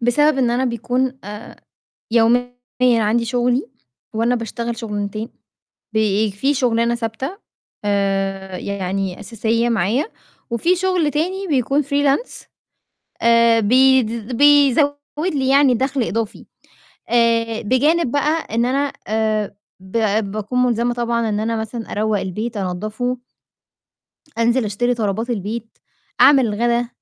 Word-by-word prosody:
بسبب 285 +5 +3
إن 245 -3 +2
أنا 250 +2 +1
بيكون 250 +2 -1
آآ 210 +2 -9 0.6
يوميًا 240 +2 +3 0.3
عندي 230 -1 +3
شُغلي 245 +2 0 0.5
وأنا 230 +3 +1
باشتغل 235 0 -4
شُغلانتين، 215 -1 -4 0.7
بي 215 -1 +1
في 265 +9 0
شُغلانة 235 -3 +1
ثابتة 235 - -4 0.5
آآ 195 -2 -1
يعني 195 -1 -3
أساسية 230 +1 -1
معايا 230 +5 +1 0.4
وفي 330 +10 +1
شُغل 355 -4 +1
تاني 370 +6 -2
بيكون 275 0 +1
freelance، 285 - 0 0.8
آآ 230 0 +5
بيد 240 0 +3
بيزوّد 285 0 +5 0.4
لي 265 -2 0
يعني 275 -1 +5
دَخْل 265 +2 0
إضافي. 225 -1 -3 0.6
آآ 230 -1 +2
بجانب 275 +6 +2
بقى 300 -3 0
إن 235 - +2
أنا 275 +3 0 0.2
آآ 215 -2 -1 0.2
ب 190 +4 -4 0.3
باكون 215 +4 -3
مُلزمة 240 0 +1
طبعًا 235 -1 -1
إن 210 -1 -1
أنا 225 +1 -1
مثلًا 220 +1 -5
أروّق 215 -1 0
البيت، 215 +5 -4
أنضّفه 215 +6 -3 1.2
أنزل 235 +2 +2
أشتري 240 +4 0
طلبات 225 +1 -2
البيت، 225 +1 -5 0.4
أعمل 275 -3 +6
الغَدا، 235 +3 0
235 Hz, 120 wpm, -20 LUFS, 215-260 Hz, 1.2 s, أعمل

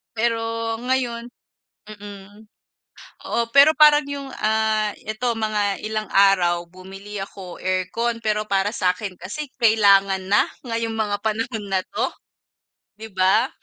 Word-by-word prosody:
pero 230 +1 +1 0.4
ngayon 245 -2 -1 0.6
mm. 205 0 -11 0.8
Oh, 235 0 -1
pero 280 +5 +6
parang 300 -1 +6
yung, 280 -1 -6
ah, 215 -1 +1
ito 225 +3 -2
mga 215 -3 -1
ilang 215 0 -3
araw 185 -3 +4
bumili 195 +3 -10
ako 195 -2 -8
aircon. 185 +6 -2
Pero 215 -1 -1
para 195 -1 +1
sakin 185 -2 -2
kasi 235 +12 -6
kailangan 200 -5 +4
na 200 - +4 0.2
ngayong 230 -2 -3
mga 215 -2 -1
panahon 220 0 -2
na 190 -1 +1
to, - - -1 0.9
'di 220 0 -9
ba? 190 0 +3
215 Hz, 125 wpm, -22 LUFS, 195-230 Hz, 0.9 s, pero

